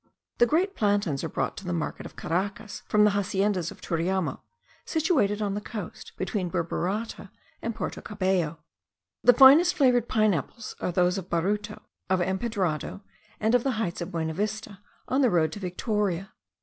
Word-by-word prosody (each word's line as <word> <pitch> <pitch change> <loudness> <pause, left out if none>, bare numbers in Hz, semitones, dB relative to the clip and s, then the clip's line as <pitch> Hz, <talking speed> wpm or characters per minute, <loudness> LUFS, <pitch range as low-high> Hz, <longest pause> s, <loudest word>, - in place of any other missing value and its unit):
The 240 - +6
great 365 - +1
plantains 200 -9 +1
are - - -2
brought - - -2
to - - -7
the 175 - -2
market 165 -2 -3
of - - -17
Caracas 200 +5 -3
from 210 0 +4
the 210 - +5
haciendas 195 -2 0
of - - -12
Turiamo, 180 +2 -1 0.4
situated 270 - +1
on 200 -1 -1
the 205 - -3
coast 210 -5 -7
between 185 -1 -2
Burburata 185 +5 -2 0.3
and 230 -1 -3
Porto - - -4
Cabello. 185 -6 -1 0.7
The 245 - +8
finest 285 +8 +8
flavoured 245 -4 +3
pine 215 -2 +3
apples 210 - -5
are - - -1
those 180 +2 +2
of 185 0 -10
Baruto, 200 +5 -1 0.3
of 190 -1 +2
Empedrado, 190 -2 -1 0.4
and 220 +2 +1
of 245 -1 +4
the 270 - +1
heights 205 -6 -2
of 170 - -4
Buenavista, 200 +6 -3 0.3
on 265 +2 +2
the 255 - +5
road 160 -5 +2
to 205 - -7
Victoria. 195 0 -2
200 Hz, 165 wpm, -27 LUFS, 180-220 Hz, 0.7 s, The